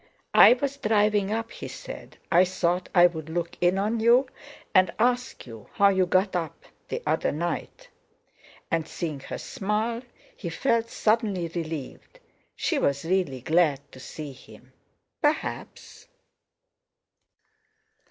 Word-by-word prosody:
"I - - +9
was 275 +2 -3
driving 210 -4 +2
up," 225 +1 -2
he - - -7
said. - - -10
"Thought 180 0 +2
I'd 175 -1 +6 0.2
look 170 +1 -3
in 180 +2 +3
on 215 +4 0
you, 240 +4 +5 0.5
and 185 -2 +5
ask 245 +2 0
you 115 -4 -12
how 200 0 +5
you 190 -2 +2
got 185 +2 +2
up 165 -3 -4 0.2
the - - -4
other - - +1
night." 175 - -4 0.8
And, 165 -1 0
seeing 155 -5 -4
her - - -7
smile, 215 +4 -2 0.3
he 175 - -6
felt 230 +5 0
suddenly 210 -7 0
relieved. 160 -5 -6 0.4
She - - 0
was 140 +2 0
really 170 -8 0
glad 160 -1 +2
to 130 - -13
see 150 +2 -8
him, 130 - -16 0.5
perhaps. 300 0 -3
185 Hz, 125 wpm, -26 LUFS, 165-225 Hz, 0.8 s, I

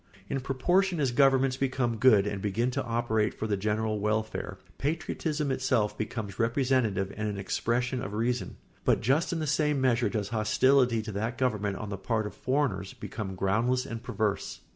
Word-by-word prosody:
] 95 +1 -25
In 135 - 0
proportion 175 +8 +1
as 135 -4 +1
governments 135 0 +3
become 130 -3 0
good 105 -4 +5
and 100 -2 -3
begin 110 +5 0
to - - -2
operate 115 -2 0
for - - -4
the 105 -2 0
general 105 +2 -1
welfare, 105 -2 -2 0.2
patriotism 150 -1 -1
itself 130 -5 +1
becomes 105 -2 -5
representative 115 -5 +1
and 110 +1 -2
an 105 -1 -3
expression 120 +5 -1
of 100 -2 -5
reason; 120 +3 -1 0.3
but - - +2
just 135 +8 +2
in 170 - -1
the 155 - -2
same 150 -1 +1
measure 125 -2 +2
does 105 -3 -2
hostility 120 +2 +3
to 110 - -5
that 110 +4 -3
government 105 -6 0
on 105 - -6
the 100 - -3
part 110 0 -1
of 105 - -5
foreigners 130 -9 -1
become 95 -4 -6
groundless 115 +7 +1
and 115 -1 -6
perverse. 110 -4 -2
115 Hz, 180 wpm, -29 LUFS, 105-130 Hz, 0.3 s, good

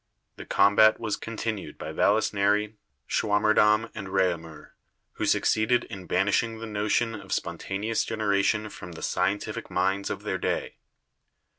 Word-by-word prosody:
The - - -9
combat 100 +2 +5
was 110 -3 -2
continued 110 -2 -5
by - - -6
Vallisneri, 105 0 +2 0.3
Schwammerdam 105 +1 +3
and 95 - -6
Reaumur, 85 -5 -2 0.4
who - - -3
succeeded 115 +3 +2
in 95 -4 -8
banishing 110 +5 +1
the 115 - -7
notion 110 +2 0
of 100 -3 -9
spontaneous 100 +6 -2
generation 105 0 0
from 90 -2 -9
the 80 - -9
scientific 100 +1 -1
minds 95 +2 0
of - - -5
their - - -2
day. - - -2
105 Hz, 130 wpm, -26 LUFS, 95-110 Hz, 0.4 s, combat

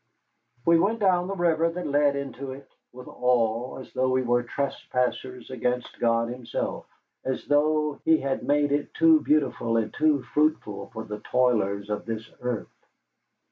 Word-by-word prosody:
We 170 0 +5
went 220 +6 +1
down 185 -3 +3
the 195 - -3
river 165 -2 +2
that 180 +2 -5
led 145 0 +2
into 135 -1 -5
it, 135 0 -12 0.2
with 125 0 -11
awe, 120 -1 0
as 130 - -11
though 130 0 +1
we 130 0 +2
were 120 0 +2
trespassers 125 -1 -3
against 125 0 -2
God 115 0 +2
Himself, 125 -1 -4 0.4
as 130 -1 -3
though 150 0 +2
He 160 0 +5
had 135 -2 -2
made 145 0 +2
it 145 0 0
too 325 -1 +6
beautiful 140 - +1
and 110 -1 -1
too 155 -4 +2
fruitful 110 -10 0
for 110 - -6
the 105 -1 -6
toilers 105 -5 +1
of 105 - -3
this 110 -1 -4
earth. 125 -3 -4
130 Hz, 160 wpm, -26 LUFS, 120-150 Hz, 0.4 s, too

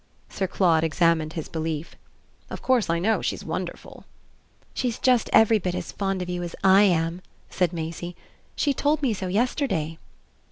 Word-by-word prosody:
Sir 190 - -2
Claude 170 -4 +2
examined 165 -1 +1
his 160 - -5
belief. 160 -1 -4 0.5
"Of - - -7
course 255 -8 +2
I 170 - +2
know 215 +6 +1
she's - - -3
wonderful." - - -6 0.7
"She's 245 -3 -2
just 250 -3 +2
every 220 0 +5
bit 180 -2 -2
as - - -5
fond 195 -2 -2
of - - -7
you 180 0 -3
as 175 -1 -5
I 190 +1 +7
am," 170 -1 +1 0.3
said 180 -2 +1
Maisie. 170 +1 -5 0.4
"She 285 - +1
told 295 +3 0
me 250 -5 +2
so 190 -2 -4
yesterday." 195 - -1
180 Hz, 165 wpm, -25 LUFS, 165-220 Hz, 0.7 s, I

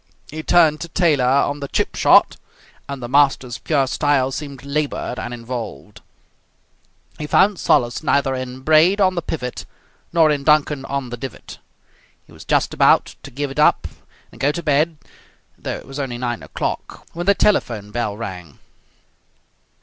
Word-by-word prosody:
He 155 +1 -5
turned 155 -2 +3
to 170 - -4
Taylor 160 -5 +2
"On 140 +2 +2
the 140 - -5
Chip - - -1
Shot", - - +5 0.5
and 140 -3 -6
the - - -4
master's 135 -2 +2
pure 145 -4 +1
style 135 -1 +1
seemed 140 -1 -7
laboured 140 -3 -3
and 120 - -5
involved. 115 - -7 1.2
He 150 - -4
found 195 +4 +3
solace 120 0 +1
neither 140 -3 +1
in 130 0 -6
Braid 160 +7 +4
"On 185 -2 +3
the 175 - -2
Pivot" 125 -6 -5 0.5
nor 160 -2 +4
in 145 -2 -1
Duncan 150 -2 +2
"On 135 -3 -4
the 120 - -5
Divot". 135 +2 -9 0.7
He - - -19
was - - -13
just - - +1
about - - +3
to - - -10
give 140 +2 -4
it 135 - -6
up 150 - +3 0.4
and - - -14
go 140 +2 +3
to 170 +3 -6
bed 155 +2 +1 0.6
though - - -5
it - - -12
was 135 +2 -8
only 130 -4 -3
nine 120 -1 -3
o'clock, - - -5
when 175 +2 -5
the 200 - +5
telephone 115 - 0
bell 105 -3 -3
rang. 90 -9 -8
140 Hz, 165 wpm, -20 LUFS, 125-155 Hz, 1.2 s, Shot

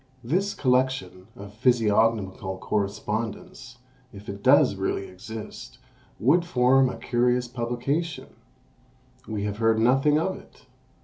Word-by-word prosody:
This 185 +11 -1
collection 130 -7 0
of 100 +1 -11
physiognomical 110 -4 +1
correspondence, 110 +5 -4 0.3
if 100 +1 -11
it 100 0 -7
does 130 0 +5
really 95 0 -2
exist, 95 - -9 0.4
would 155 +9 +3
form 130 -4 +3
a - - -6
curious 125 +1 0
publication; 125 +7 -3 1.0
we 105 -2 -3
have 105 0 -3
heard 115 0 +2
nothing 135 +6 +3
of 185 +4 -1
it! - - -18
120 Hz, 115 wpm, -25 LUFS, 105-130 Hz, 1.0 s, does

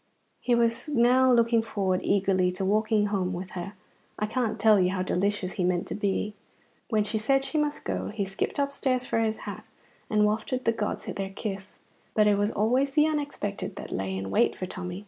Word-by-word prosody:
He 245 - +2
was 230 +2 +1
now 255 -1 +4
looking 235 -1 +4
forward 195 -4 -1
eagerly 190 -2 +2
to 190 +1 -2
walking 215 +1 +2
home 185 -2 0
with 180 +1 -6
her. 185 +2 -6 0.4
I 210 - 0
can't 225 0 -1
tell 215 -1 +5
you 180 -1 +3
how 185 -1 -1
delicious 190 0 -1
he 185 - -2
meant 175 -1 +1
to - - -3
be. 205 0 -1 0.6
When 215 -2 +2
she 215 +1 -2
said 270 +5 +2
she 305 +3 -1
must 295 0 -1
go, - - -2
he 210 -2 -3
skipped 195 +1 -3
upstairs 275 -3 0
for 225 - 0
his 220 -1 -1
hat, - - -7 0.4
and 210 -1 +3
wafted 220 +4 -1
the 230 - +4
gods 215 -2 -3
their 195 -1 -4
kiss. 195 0 -6 0.4
But 215 - +5
it 210 -1 +4
was 205 +1 +2
always 255 +7 +1
the 300 - +5
unexpected 285 -10 -3
that - - -8
lay 95 0 -2
in 95 0 -4
wait - - +3
for 185 - -4
Tommy. 180 0 -6
210 Hz, 205 wpm, -27 LUFS, 190-235 Hz, 0.6 s, tell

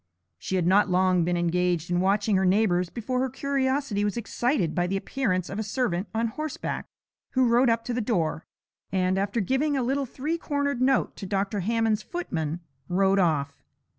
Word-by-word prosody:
She 190 - -3
had 180 -3 +1
not 195 +3 +4
long 185 -1 +3
been 175 +1 0
engaged 175 0 0
in 175 - +2
watching 200 +2 +2
her 190 - +2
neighbours 185 -2 +2
before 250 +4 -3
her 260 +1 0
curiosity 270 -4 -1
was 205 +2 -1
excited 235 - 0
by 175 0 0
the 195 +2 -1
appearance 195 -5 -1
of 195 - -5
a - - -1
servant 205 -4 -1
on 225 +1 0
horseback, 305 +5 -4 0.5
who 260 -1 +3
rode 240 +2 +4
up 230 0 +1
to 245 - -2
the 245 - -1
door, 170 -8 -1 0.4
and, 185 0 +1
after 200 +4 -1
giving 265 +7 +1
a 260 - 0
little 270 +2 0
three 305 +7 -3
cornered 285 -5 -1
note 265 0 +2
to 195 - -6
Dr. 200 +1 -1
Hammond's 220 +2 +1
footman, 170 - -4 0.3
rode 195 +2 +3
off. 145 -6 0
205 Hz, 185 wpm, -26 LUFS, 180-255 Hz, 0.5 s, not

